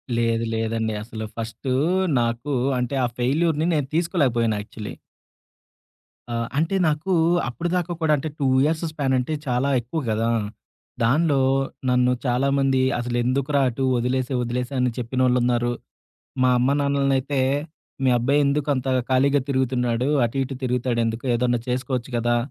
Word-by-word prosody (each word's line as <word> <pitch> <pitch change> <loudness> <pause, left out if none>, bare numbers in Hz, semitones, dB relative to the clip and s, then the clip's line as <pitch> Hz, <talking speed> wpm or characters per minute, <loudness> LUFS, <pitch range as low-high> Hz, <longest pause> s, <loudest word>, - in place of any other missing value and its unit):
లేదు. 115 0 +1
లేదండి. 110 0 -1
అసలు 110 -1 -6
ఫస్టు 115 +3 -3 0.5
నాకు 120 +5 -2 0.3
అంటే 125 +2 -2
ఆ - - +1
ఫెయిల్యూర్‌ని 155 +5 +1
నేను 145 -3 0
తీసుకోలేకపోయాను 130 - +1
యాక్చువలీ. 105 0 -8 1.4
ఆహ్, 115 0 -2
అంటే 165 +6 +1
నాకు 155 +5 -1 0.4
అప్పటిదాకా 175 +5 -2
కూడా 155 -1 +3
అంటే, 155 +3 -4
2 140 - +1 0.2
ఇయర్స్ 155 +2 +1
స్పాన్ 140 -4 -1
అంటే 125 +5 -1
చాలా 125 +2 +1
ఎక్కువ 140 +8 -4
గదా! 110 +1 0 0.7
దానిలో 140 +3 +3 0.5
నన్ను 125 0 +3
చాలామంది, 135 +1 +2 0.2
"అసలెందుకురా 125 +4 0
అటు? 125 +3 -4
ఒదిలేసే, 125 +2 -1
ఒదిలేసే" 125 +3 -3
అని 125 -1 +2
చెప్పినోళ్ళున్నారు, 125 -1 +1 0.7
మా 130 - +4
అమ్మ, 125 +2 +2
నాన్నలనైతే, 140 -1 +1 0.6
"మీ 130 - +4
అబ్బాయెందుకు 140 +3 +1
అంత 130 0 -3 0.2
ఖాళీగా 140 +2 +3
తిరుగుతున్నాడు? 125 -2 0 0.2
అటు, 115 - -7
ఇటు 135 0 -6
తిరుగుతాాడెందుకు? 120 -2 -1
ఏదన్నా 120 0 +1
చేసుకోచ్చు 125 0 -2
గదా!" 120 0 +1
130 Hz, 125 wpm, -23 LUFS, 120-140 Hz, 1.4 s, మా